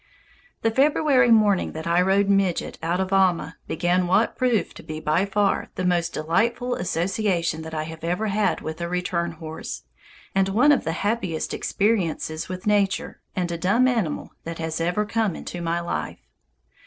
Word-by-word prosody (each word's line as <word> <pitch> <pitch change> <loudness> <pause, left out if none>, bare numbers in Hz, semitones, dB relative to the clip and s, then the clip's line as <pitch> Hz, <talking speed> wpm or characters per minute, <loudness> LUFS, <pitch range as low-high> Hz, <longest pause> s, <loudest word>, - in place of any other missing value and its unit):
The 225 - +3
February 270 -1 +4
morning 210 -4 +4
that 160 0 -6
I 170 +1 +3
rode 195 +2 +3
"Midget" 195 -3 +1
out 170 +3 0
of 190 0 -1
Alma 180 -5 +2
began 175 +2 +1
what 190 +6 +2
proved 240 -8 0
to - - -9
be 155 0 -6
by 160 +5 +1
far 200 0 +1
the 185 - -2
most 175 -1 +1
delightful 230 +10 0
association 175 -2 -1
that 160 0 -7
I 155 - -1
have 160 0 -9
ever 180 +6 -1
had 210 0 +1
with 160 +2 -6
a 170 - -2
return 175 -1 -1
horse, 155 - -7 0.5
and 195 0 +2
one 245 +9 +4
of 285 - +2
the 160 - -1
happiest 195 -7 -1
experiences 180 -7 -1
with 185 0 -6
nature 205 -2 +1
and 180 -2 -1
a 170 - -3
dumb 215 +9 +3
animal 225 -12 -1
that 165 0 -6
has 160 0 -3
ever 180 +5 0
come 215 -3 0
into 175 - -6
my 170 0 0
life. 170 - -4
180 Hz, 175 wpm, -24 LUFS, 165-210 Hz, 0.5 s, February